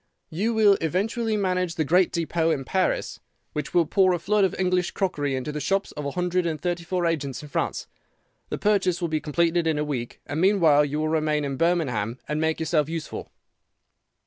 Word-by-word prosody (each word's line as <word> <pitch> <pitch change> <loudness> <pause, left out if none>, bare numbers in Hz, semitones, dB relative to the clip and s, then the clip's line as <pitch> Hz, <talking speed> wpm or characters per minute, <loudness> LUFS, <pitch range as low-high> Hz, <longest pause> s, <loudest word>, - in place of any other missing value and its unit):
"'You 215 +8 -1
will 205 -3 +5
eventually 215 - 0
manage 185 -3 0
the 155 - 0
great 180 +4 +3
depôt 165 -1 0
in 135 -2 -6
Paris, 185 +6 -1 0.3
which 150 - -4
will 170 -2 +5
pour 185 +3 +3
a - - +1
flood 205 +4 +1
of 190 - +1
English 180 -1 +1
crockery 145 -8 -1
into 130 +3 -3
the 150 - -4
shops 195 +7 0
of 150 -1 -5
a - - -3
hundred 180 0 0
and 155 -2 -2
thirty 175 +1 -2
four 175 +1 -1
agents 145 -6 -2
in 150 - -10
France. - - -2 0.6
The - - -3
purchase 190 -4 +1
will 170 -2 -2
be 155 -1 -1
completed 165 +3 +1
in 160 -2 +1
a 150 - 0
week, 125 -5 -4
and 150 +3 -3
meanwhile 170 -7 +5
you 145 0 -2
will 155 0 0
remain 155 -2 +1
in 135 -1 -3
Birmingham 130 -9 0
and 150 +1 -1
make 160 0 0
yourself 160 -2 +1
useful. 165 -2 -5
165 Hz, 200 wpm, -25 LUFS, 150-185 Hz, 0.6 s, will